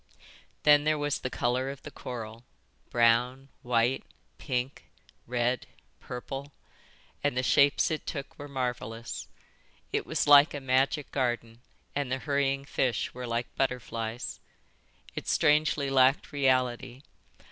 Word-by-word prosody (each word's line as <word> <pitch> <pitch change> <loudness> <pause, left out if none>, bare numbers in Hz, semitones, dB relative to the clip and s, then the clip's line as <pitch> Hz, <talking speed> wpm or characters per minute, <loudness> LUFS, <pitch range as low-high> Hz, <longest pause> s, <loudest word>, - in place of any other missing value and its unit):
Then 145 -1 +6
there 155 0 +2
was 145 0 -1
the 130 - -3
colour 125 +2 0
of 140 0 -8
the - - -8
coral, 115 -2 -7 0.5
brown, 125 +3 +2
white, 120 +1 +1 0.4
pink, 125 +1 -3 0.4
red, 125 +1 0 0.3
purple; 135 +3 -7 0.7
and 145 -3 0
the 125 - +1
shapes 140 +4 +4
it 155 - -3
took 140 -3 -6
were 145 - -7
marvellous. 120 -4 -4 0.7
It - - -1
was - - 0
like 145 +1 +7
a - - -3
magic 135 +3 +1
garden, 120 -3 -2 0.3
and 140 -3 -1
the 130 - +1
hurrying 140 0 0
fish 125 -5 -1
were 125 0 -6
like 115 +1 -3
butterflies. 120 -3 -3 0.7
It - - -6
strangely 150 -2 +2
lacked 135 +1 +4
reality. 130 -2 0
130 Hz, 125 wpm, -29 LUFS, 120-140 Hz, 0.7 s, like